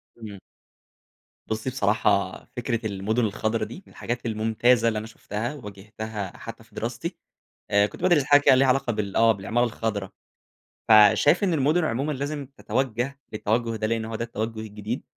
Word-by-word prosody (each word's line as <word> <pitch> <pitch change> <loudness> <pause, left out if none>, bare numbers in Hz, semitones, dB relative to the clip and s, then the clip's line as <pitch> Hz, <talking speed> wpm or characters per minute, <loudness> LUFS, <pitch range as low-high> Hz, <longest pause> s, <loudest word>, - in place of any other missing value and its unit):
تمام. 105 -4 -9 1.1
بُصّي 110 +4 -2
بصراحة، 100 -5 +1
فكرة 115 -2 -2
المُدُن 110 +3 0
الخضرا 110 +2 -1
دي، 190 - -10
من - - -18
الحاجات 120 0 -4
الممتازة 115 +2 +2
اللي 110 -1 +1
أنا 110 - -7
شُفتها، 110 +3 -5
وواجهتها 105 -3 -7
حتّى - - -9
في - - -24
دراستي. - - -4 0.5
آآ 100 0 +4
كنت - - -12
بادرس 160 -7 +4
حاجة 145 0 +6
كده 135 - +6
ليها 135 +1 +4
علاقة 130 -2 +2
بال 100 -2 -3
آه، 115 0 +6
بالعمارة 110 +4 0
الخضرا. 110 -4 -3 0.8
فشايف 110 - +6
إن 180 -4 +2
المُدُن 155 +4 +2
عمومًا 140 +2 -1
لازم 145 +1 -4
تَتَوجّه 130 +1 -2
للتَوجّه 115 +2 -1
ده، 110 - -1
لإن 115 0 -1
هو 115 - -6
ده 115 - -3
التَوجّه 110 -1 -4
الجديد. 105 +3 -5
115 Hz, 160 wpm, -25 LUFS, 105-130 Hz, 1.1 s, حاجة